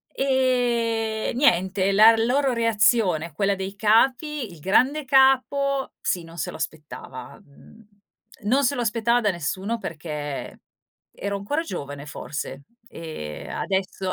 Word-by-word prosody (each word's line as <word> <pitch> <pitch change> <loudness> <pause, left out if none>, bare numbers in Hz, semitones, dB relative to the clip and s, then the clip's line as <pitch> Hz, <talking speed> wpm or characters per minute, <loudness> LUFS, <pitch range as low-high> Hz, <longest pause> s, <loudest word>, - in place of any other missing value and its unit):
Ehm, 235 -5 0
niente, 190 -6 +2
la 220 +3 +7
loro 255 +4 +2
reazione, 215 -8 +2
quella 195 +5 +1
dei 195 +1 -5
capi: 250 - +2
il 170 - -13
grande 260 - +2
capo 270 +1 +3
sì 175 -2 -1
non 165 +1 -13
se - - -3
lo - - -9
aspettava; 150 -5 -7
mhmm, 210 +9 -19 0.6
non 260 +7 +2
se 275 +3 +2
lo 245 - -2
aspettava 235 +1 +1
da 205 -3 +2
nessuno 190 +6 -3
perché 150 -6 -6 0.6
ero 200 0 -2
ancora 205 +11 -2
giovane 145 - -6
forse 145 -2 -6 0.2
e 155 - -8
adesso 190 -1 -2
215 Hz, 125 wpm, -24 LUFS, 170-250 Hz, 0.6 s, la